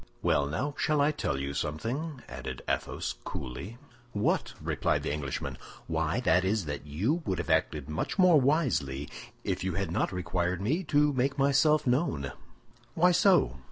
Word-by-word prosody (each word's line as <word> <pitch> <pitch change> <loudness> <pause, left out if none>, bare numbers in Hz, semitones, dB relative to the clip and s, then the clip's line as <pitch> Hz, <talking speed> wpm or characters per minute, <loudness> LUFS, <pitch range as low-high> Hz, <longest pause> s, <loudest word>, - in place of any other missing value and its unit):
"Well! 70 - +2
now 130 - -2
shall 150 -1 +2
I 145 +2 +4
tell 145 - -2
you 70 +1 -3
something?" 120 - -3
added 65 0 -6
Athos, - - -2
coolly. 70 - -6 0.4
"What?" 105 0 0
replied - - 0
the - - -1
Englishman. 70 -3 -4 0.3
"Why, 80 +5 0
that 90 -5 +3
is 100 0 0
that 75 0 -5
you 105 - 0
would 95 - 0
have 85 -1 -2
acted 75 -2 +1
much 75 - -3
more 180 -6 +6
wisely 80 - +1 0.4
if - - -2
you 95 -2 -1
had 95 -3 -2
not - - 0
required 90 -1 -1
me 140 - 0
to 145 0 +3
make 135 +2 0
myself 140 +2 +4
known." 125 - 0 0.6
"Why 180 +2 +5
so?" 180 - +4
95 Hz, 160 wpm, -29 LUFS, -, 0.6 s, more